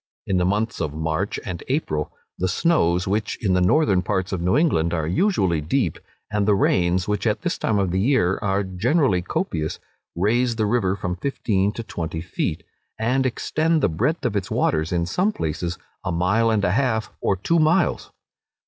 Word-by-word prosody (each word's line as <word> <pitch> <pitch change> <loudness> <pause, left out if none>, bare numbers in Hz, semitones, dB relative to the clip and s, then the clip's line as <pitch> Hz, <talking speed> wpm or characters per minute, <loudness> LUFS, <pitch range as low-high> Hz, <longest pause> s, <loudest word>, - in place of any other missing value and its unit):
In 95 - 0
the 90 - +2
months 105 +4 -1
of 75 -2 -3
March 80 +5 -2
and 90 -4 -5
April, 75 - -1 0.3
the 95 - +1
snows, 90 - +2
which 105 +2 -1
in 95 -4 +1
the 90 - +3
northern 95 - +3
parts 95 0 -2
of 95 -3 -2
New 90 +9 +2
England 85 - +2
are 80 -2 -1
usually 95 - +1
deep, 85 - -1 0.3
and 105 -1 0
the 105 - +5
rains, 90 -1 +2
which 105 +2 0
at 105 - 0
this 175 -1 -1
time 110 - +1
of 95 -3 +1
the 95 - 0
year 105 -5 +2
are 100 -1 0
generally 100 - +1
copious, 80 -3 -2 0.4
raise 115 +7 +1
the 110 -1 0
river 105 -4 +1
from 90 -2 -3
fifteen 100 -4 0
to 115 - -5
twenty 80 -6 -4
feet, 85 -1 -3 0.3
and 130 +4 +1
extend 160 +5 0
the - - +4
breadth 150 - -1
of 105 - 0
its 100 -3 -2
waters 80 +1 0
in 85 -1 +1
some 185 - +1
places 85 - -3 0.3
a - - -2
mile 100 +7 +2
and 105 -3 +1
a 90 - +2
half, 110 -1 0
or 100 - +1
two 165 - +1
miles. 160 +1 +2
95 Hz, 190 wpm, -23 LUFS, 90-120 Hz, 0.4 s, the